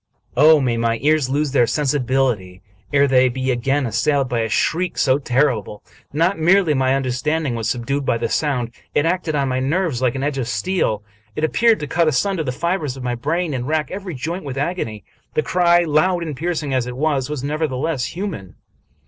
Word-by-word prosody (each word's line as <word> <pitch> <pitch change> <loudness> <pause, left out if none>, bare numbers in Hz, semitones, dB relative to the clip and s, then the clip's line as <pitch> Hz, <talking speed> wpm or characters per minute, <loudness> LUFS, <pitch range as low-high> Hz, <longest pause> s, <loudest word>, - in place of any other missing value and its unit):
Oh, 155 +3 +6
may 125 -4 0
my 115 0 +1
ears 150 -3 +2
lose 145 +1 0
their 125 -4 +3
sensibility 130 -10 0 0.3
ere 140 -1 +4
they 130 -1 +4
be 130 +1 -1
again 135 +3 0
assailed 130 +5 +1
by 120 -2 0
a 110 0 -1
shriek 175 - 0
so 135 -1 +3
terrible! 125 -6 0 0.3
Not 165 +5 +1
merely 175 0 +4
my 130 -1 +2
understanding 135 +2 -1
was 115 -2 -2
subdued 135 +4 -2
by 115 - +1
the - - -1
sound; 125 -6 -1 0.2
it 145 - +3
acted 170 -2 0
on 140 -2 +1
my 130 0 0
nerves 145 -1 0
like 125 -1 +1
an 135 - -3
edge 145 -1 -1
of 120 - -2
steel. 125 - -1 0.3
It 155 - -3
appeared 225 +8 +3
to - - -2
cut 170 +1 +1
asunder 165 +4 +1
the 130 - -2
fibers 155 -1 -2
of 130 - -7
my 125 -1 -1
brain 155 +6 -1
and 125 -1 -3
rack 155 -1 -1
every 190 -4 -5
joint 165 +8 -4
with 135 -2 -6
agony. 135 - -3 0.3
The 155 - +2
cry, 175 0 +3
loud 170 +3 +2
and 155 -4 -5
piercing 155 -1 -2
as 125 -2 0
it 125 0 -6
was, 145 -2 0
was 150 -3 -4
nevertheless 150 -1 -2
hu 190 +4 -3
man. 100 - -7
140 Hz, 200 wpm, -20 LUFS, 125-160 Hz, 0.3 s, Oh